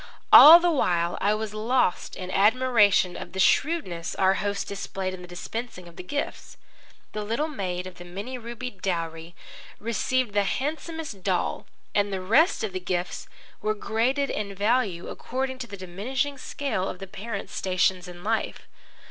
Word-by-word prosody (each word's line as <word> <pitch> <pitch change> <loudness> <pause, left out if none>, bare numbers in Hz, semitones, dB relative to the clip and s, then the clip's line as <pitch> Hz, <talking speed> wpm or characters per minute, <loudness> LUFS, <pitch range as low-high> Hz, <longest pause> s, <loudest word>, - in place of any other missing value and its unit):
All 325 +4 +12
the 350 0 +2
while 175 - +1
I 205 +2 +3
was 215 -1 -4
quite 215 - -6
lost 230 -4 0
in 185 0 -6
admiration 210 -3 +4
of 175 - -8
the 190 - -5
shrewdness 185 - +1
our 190 0 +3
host 200 0 -2
displayed 195 -1 -4
in 185 - -8
the 180 - -10
dispensing 180 +2 -6
of 170 - -14
the - - -7
gifts. 285 +11 -5 0.5
The 210 - -4
little 230 +9 -1
maid 185 - -4
of 185 -1 -10
the - - -8
many 200 +9 -6
rubied 235 -3 -7
dowry 165 -2 -3 0.4
received 235 +1 -1
the 205 0 +3
handsomest 305 - -4
doll, - - -1 0.3
and 205 0 +1
the 190 - -2
rest 230 - +3
of 210 -4 -3
the 185 - -2
gifts 180 0 -3 0.3
were 215 0 0
graded 250 +7 0
in 200 -2 -4
value 205 -4 0
according 260 +1 -4
to 250 - -5
the 200 - -8
diminishing 245 +10 -3
scale 255 -9 -3
of - - -6
the 195 - -7
parents' 200 +2 -6
stations 185 -1 0
in 175 0 -11
life. 220 +2 -2
205 Hz, 170 wpm, -26 LUFS, 185-250 Hz, 0.5 s, All